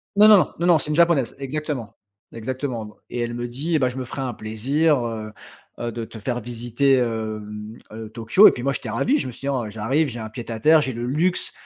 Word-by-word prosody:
Non, 210 Hz, +1 st, +7 dB
non, 215 Hz, -1 st, +9 dB, 0.2 s
non, 170 Hz, -, 0 dB
non 170 Hz, -3 st, +6 dB
c'est 150 Hz, -, -4 dB
une 150 Hz, -, 0 dB
japonaise 170 Hz, -6 st, +3 dB
exactement 140 Hz, -4 st, -4 dB, 0.4 s
exactement 115 Hz, -2 st, -5 dB
et 120 Hz, -, -4 dB
elle 120 Hz, 0 st, -2 dB
me 120 Hz, 0 st, -3 dB
dit: 145 Hz, +8 st, -2 dB
«Eh -, -, +3 dB
bah, 130 Hz, -2 st, +2 dB
je 125 Hz, -, -8 dB
me 130 Hz, -, -3 dB
ferai 135 Hz, +2 st, -6 dB
un 125 Hz, -2 st, -2 dB
plaisir, 130 Hz, +6 st, +1 dB
heu, 110 Hz, -2 st, -5 dB, 0.5 s
heu, 120 Hz, 0 st, -3 dB
de 115 Hz, 0 st, -5 dB
te 110 Hz, -, -11 dB
faire 120 Hz, +3 st, -3 dB
visiter, 120 Hz, +4 st, 0 dB
hem 110 Hz, -2 st, -3 dB, 0.2 s
heu, 110 Hz, 0 st, -8 dB
Tokyo.» 115 Hz, -, +5 dB
et -, -, +7 dB
puis 125 Hz, -, -6 dB
moi 140 Hz, -, +1 dB
j'étais 125 Hz, -3 st, -5 dB
ravi, 220 Hz, -, +1 dB
je -, -, -2 dB
me -, -, -5 dB
suis -, -, -14 dB
dit: 135 Hz, -, -4 dB
«Ah, 130 Hz, -4 st, 0 dB
j'arrive 120 Hz, +9 st, 0 dB
j'ai 120 Hz, -1 st, -7 dB
un 110 Hz, -1 st, -6 dB
pied 115 Hz, +1 st, -8 dB
à 110 Hz, -, -4 dB
terre, 155 Hz, +5 st, +6 dB
j'ai 130 Hz, -3 st, -2 dB
le 120 Hz, +1 st, -4 dB
luxe, 160 Hz, +8 st, 0 dB
120 Hz, 245 wpm, -23 LUFS, 115-145 Hz, 0.5 s, non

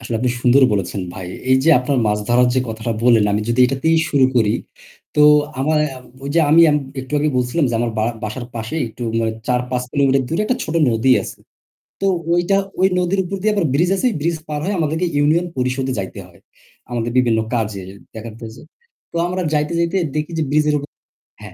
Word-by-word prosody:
আসলে 115 Hz, -, -5 dB
আপনি 125 Hz, 0 st, +1 dB
সুন্দর 125 Hz, +2 st, +4 dB
বলেছেন 100 Hz, 0 st, -2 dB
ভাই। 95 Hz, -, -7 dB, 0.2 s
এই 130 Hz, -, +6 dB
যে 165 Hz, -, +5 dB
আপনার 130 Hz, +1 st, -1 dB
মাছ 105 Hz, 0 st, +1 dB
ধরার 125 Hz, +1 st, +4 dB
যে 130 Hz, -, +2 dB
কথাটা 110 Hz, +1 st, -3 dB
বললেন 115 Hz, -3 st, +5 dB
আমি 105 Hz, -, +1 dB
যদি 120 Hz, +2 st, +1 dB
এটাতেই 140 Hz, +6 st, +1 dB
শুরু 140 Hz, -2 st, +4 dB
করি। 110 Hz, -3 st, +3 dB, 0.6 s
তো 150 Hz, -, +5 dB, 0.4 s
আমায় 150 Hz, +2 st, +2 dB, 0.4 s
ওই 140 Hz, -, -4 dB
যে 165 Hz, -, +4 dB
আমি 160 Hz, +2 st, +6 dB, 0.4 s
একটু 130 Hz, +2 st, -11 dB
আগে 150 Hz, +1 st, +1 dB
বলছিলাম 125 Hz, +6 st, 0 dB
যে -, -, -2 dB
আমার 120 Hz, 0 st, 0 dB
বারা 110 Hz, +2 st, 0 dB
বাসার 115 Hz, +3 st, -5 dB
পাশে 115 Hz, +7 st, -5 dB
একটু 115 Hz, +2 st, -10 dB, 0.2 s
মানে 110 Hz, -1 st, 0 dB
৪ 125 Hz, -1 st, +1 dB
৫ 125 Hz, -1 st, -1 dB
কিলোমিটার 135 Hz, -1 st, +2 dB
দূরে 165 Hz, +6 st, 0 dB
একটা 255 Hz, -, 0 dB
ছোট 155 Hz, -, -5 dB, 0.2 s
নদী 115 Hz, +3 st, +3 dB
আছে। -, -, -9 dB, 0.6 s
তো -, -, 0 dB, 0.3 s
ওইটা 175 Hz, +3 st, +2 dB, 0.2 s
ওই 190 Hz, -, +5 dB
নদীর 180 Hz, +2 st, 0 dB
উপর 190 Hz, +2 st, -5 dB
দিয়ে 215 Hz, +2 st, +2 dB
আবার 195 Hz, -5 st, +1 dB
bridge 170 Hz, +6 st, +2 dB
আছে। 255 Hz, -, +1 dB
bridge 165 Hz, +1 st, -1 dB
পার 150 Hz, -1 st, -3 dB
হয়ে 200 Hz, +2 st, -1 dB
আমাদেরকে 160 Hz, +2 st, 0 dB
ইউনিয়ন 155 Hz, +4 st, +2 dB
পরিষদে 130 Hz, +1 st, -1 dB
যাইতে 95 Hz, -, -6 dB
হয়, -, -, -21 dB, 0.5 s
আমাদের 120 Hz, -1 st, -2 dB
বিভিন্ন 120 Hz, -3 st, +3 dB
কাজে 110 Hz, -4 st, -2 dB
য -, -, -9 dB, 0.2 s
দেখার 110 Hz, 0 st, -7 dB, 0.2 s
জ -, -, -16 dB, 0.5 s
তো -, -, -12 dB
আমরা 180 Hz, +1 st, -3 dB
যাইতে, 150 Hz, +2 st, 0 dB
যাইতে 170 Hz, +3 st, 0 dB, 0.2 s
দেখি 155 Hz, +2 st, -2 dB
যে -, -, +1 dB
bridge 150 Hz, +1 st, +2 dB
এর 150 Hz, -, +2 dB
উপ 145 Hz, -, -6 dB, 0.6 s
হ্যাঁ 105 Hz, -3 st, -10 dB
135 Hz, 205 wpm, -19 LUFS, 120-160 Hz, 0.6 s, এই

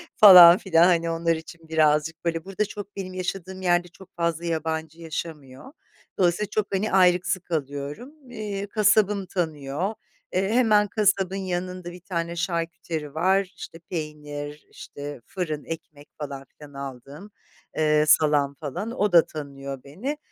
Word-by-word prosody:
falan 180 Hz, -4 st, +10 dB
filan, 170 Hz, -6 st, +3 dB
Hani 170 Hz, -2 st, +2 dB
onlar 165 Hz, 0 st, +1 dB
için 160 Hz, 0 st, -11 dB
birazcık 155 Hz, +1 st, +1 dB
böyle; 165 Hz, -1 st, -1 dB
burada, 195 Hz, +2 st, -1 dB
çok 205 Hz, 0 st, -9 dB
benim 185 Hz, -2 st, -6 dB
yaşadığım 185 Hz, 0 st, -5 dB
yerde 175 Hz, -1 st, +2 dB
çok 185 Hz, +2 st, -17 dB
fazla 170 Hz, -1 st, -1 dB
yabancı 160 Hz, 0 st, -3 dB
yaşamıyor. 155 Hz, -, -7 dB, 0.5 s
Dolayısıyla 185 Hz, +3 st, +1 dB
çok 215 Hz, -1 st, -1 dB
hani 210 Hz, +3 st, -1 dB
ayrıksı 185 Hz, 0 st, +3 dB
kalıyorum. 145 Hz, -, -5 dB, 0.6 s
Kasabım 210 Hz, -2 st, +3 dB
tanıyor, 160 Hz, +1 st, -3 dB, 0.4 s
eee, 190 Hz, +2 st, +1 dB
hemen 215 Hz, -3 st, +4 dB
kasabın 200 Hz, -2 st, +1 dB
yanında 180 Hz, -1 st, -4 dB
bir 180 Hz, +1 st, -12 dB
tane 170 Hz, -2 st, -3 dB
şarküteri 165 Hz, -3 st, -3 dB
var; 190 Hz, +3 st, +1 dB
işte 165 Hz, -, -9 dB
peynir, 150 Hz, -2 st, -6 dB
işte 145 Hz, -2 st, -9 dB
fırın, 155 Hz, -6 st, -4 dB
ekmek 155 Hz, -3 st, -8 dB
falan 140 Hz, -2 st, -6 dB
filan 145 Hz, +1 st, -16 dB
aldığım, 140 Hz, -, -9 dB, 0.5 s
ııı, 150 Hz, -1 st, +3 dB
salam 150 Hz, -2 st, +3 dB
falan 160 Hz, -, -5 dB
o 210 Hz, -4 st, 0 dB
da 170 Hz, -2 st, +6 dB
tanıyor 140 Hz, -3 st, -7 dB
beni. 220 Hz, -, -5 dB
170 Hz, 135 wpm, -25 LUFS, 150-190 Hz, 0.6 s, falan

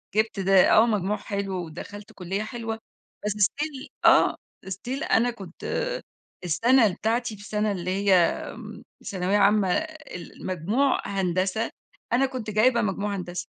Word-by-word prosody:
جِبت 215 Hz, -2 st, +1 dB
ده 190 Hz, 0 st, +5 dB
آه، 220 Hz, -, +7 dB
مجموع 210 Hz, -2 st, 0 dB
حلو 195 Hz, -3 st, -3 dB
ودخلت 205 Hz, +7 st, -9 dB
كلية 195 Hz, +2 st, -3 dB
حلوة، 225 Hz, -1 st, -5 dB, 0.5 s
بس 210 Hz, -, +1 dB
still 270 Hz, +7 st, -1 dB, 0.2 s
آه، -, -, +5 dB, 0.3 s
still 245 Hz, +8 st, -4 dB
أنا 240 Hz, +2 st, +4 dB
كنت 195 Hz, -6 st, -11 dB, 0.9 s
السنة 225 Hz, +4 st, +4 dB
بتاعتي 225 Hz, +2 st, -1 dB
في -, -, -14 dB
السنة 210 Hz, 0 st, -1 dB
اللي 185 Hz, -1 st, -3 dB
هي 195 Hz, 0 st, +2 dB
آمم، 175 Hz, -2 st, -1 dB, 0.2 s
ثانوية 190 Hz, +1 st, 0 dB
عامة 205 Hz, -2 st, +4 dB
ال 315 Hz, -, -7 dB
المجموع 205 Hz, -, +1 dB
هندسة، 190 Hz, +3 st, 0 dB, 0.4 s
أنا 265 Hz, +3 st, +4 dB
كنت 255 Hz, -5 st, -5 dB
جايبة 235 Hz, +3 st, +3 dB
مجموع 200 Hz, 0 st, -1 dB
هندسة. 180 Hz, -1 st, -5 dB
205 Hz, 135 wpm, -25 LUFS, 190-230 Hz, 0.9 s, آه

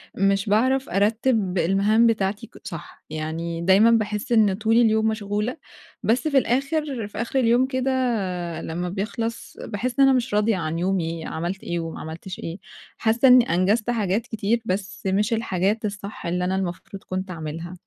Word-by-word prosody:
مش 195 Hz, +1 st, +1 dB
باعرف 260 Hz, +5 st, +2 dB
أرتِّب 210 Hz, -1 st, +1 dB
المهام 200 Hz, +6 st, +3 dB
بتاعتي 205 Hz, -2 st, -1 dB
ك -, -, -17 dB
صح، -, -, -9 dB
يعني 165 Hz, +2 st, -4 dB
دايماً 195 Hz, +6 st, +5 dB
باحِسّ 215 Hz, -1 st, 0 dB
إن 215 Hz, -4 st, +4 dB
طول 220 Hz, +3 st, +1 dB
اليوم 220 Hz, -2 st, +4 dB
مشغولة، 210 Hz, +3 st, -2 dB, 0.5 s
بس 250 Hz, +8 st, +1 dB
في 280 Hz, -, +2 dB
الآخر 270 Hz, -1 st, 0 dB
في 210 Hz, -, -11 dB
آخر 240 Hz, +3 st, -1 dB
اليوم 240 Hz, +1 st, +4 dB
كده 260 Hz, 0 st, -1 dB, 0.7 s
لمّا 175 Hz, +2 st, -4 dB
بيخلص 225 Hz, +4 st, -4 dB
باحِسّ 240 Hz, +5 st, -3 dB
إن 275 Hz, -, +8 dB
أنا 270 Hz, -, +5 dB
مش 250 Hz, -3 st, -1 dB
راضية 210 Hz, 0 st, +2 dB
عن 165 Hz, -1 st, -2 dB
يومي 170 Hz, -3 st, -1 dB
عملت 175 Hz, +4 st, -4 dB
إيه 175 Hz, 0 st, -2 dB
وما 165 Hz, -1 st, -5 dB
عملتش 165 Hz, +4 st, -7 dB
إيه، 165 Hz, +2 st, -5 dB, 0.4 s
حاسَّة 235 Hz, +3 st, +3 dB
إني 250 Hz, -1 st, +7 dB
أنجزت 205 Hz, +6 st, +1 dB
حاجات 210 Hz, -3 st, +1 dB
كتير 220 Hz, +1 st, 0 dB
بس 195 Hz, 0 st, -3 dB
مش 205 Hz, +4 st, +1 dB
الحاجات 215 Hz, -1 st, 0 dB
الصح 205 Hz, 0 st, -6 dB
اللي 180 Hz, +1 st, -1 dB
أنا 185 Hz, -, 0 dB
المفروض 190 Hz, +1 st, -5 dB
كنت 185 Hz, 0 st, -4 dB
أعملها، 165 Hz, +1 st, -6 dB
205 Hz, 165 wpm, -23 LUFS, 185-230 Hz, 0.7 s, إن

